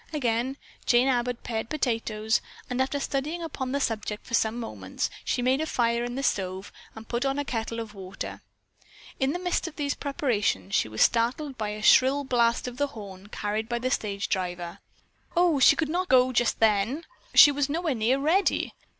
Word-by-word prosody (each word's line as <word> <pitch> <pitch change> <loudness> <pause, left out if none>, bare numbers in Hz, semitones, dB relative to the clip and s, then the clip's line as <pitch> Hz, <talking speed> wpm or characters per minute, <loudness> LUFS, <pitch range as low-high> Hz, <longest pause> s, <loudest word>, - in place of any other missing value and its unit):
Again 255 -2 -1 0.3
Jane 245 +2 +4
Abbott 245 -2 0
pared 225 -1 -3
potatoes 225 -6 0 0.3
and 250 +1 0
after 270 +2 0
studying 295 +5 -2
upon 265 -5 -4
the 280 - 0
subject 215 -5 -2
for 235 - -11
some 225 +1 +1
moments 100 - -4
she 245 - -1
made 260 +3 +2
a 315 - -2
fire 235 -3 +1
in 245 0 -4
the 275 - -3
stove 190 -4 -2 0.2
and 220 0 -10
put 240 +1 -1
on 270 0 0
a 285 - -1
kettle 230 -2 -3
of 225 -2 -6
water. 195 -1 -7 0.8
In 265 +1 +2
the 350 - -2
midst 355 0 -1
of 335 - -8
these 285 -1 -1
preparations 210 - -1
she - - +2
was 110 0 +2
startled 250 +5 +1
by 210 -3 -3
the 215 - -8
shrill 270 +5 +5
blast 240 -2 +1
of 245 0 -7
the 285 - +1
horn 200 -7 -10
carried 210 +1 -3
by 240 - 0
the 255 +2 -2
stage 200 -2 -1
driver. 175 -2 -3 0.6
Oh, 345 -5 +4
she 260 - +7
could 320 - 0
not 355 +4 -1
go 255 0 +5
just 240 -1 +1
then. 225 +8 +2 0.3
She 290 - +10
was 285 0 -1
nowhere 325 0 0
near 240 +3 +1
ready. 325 +8 +1
245 Hz, 195 wpm, -27 LUFS, 220-280 Hz, 0.8 s, She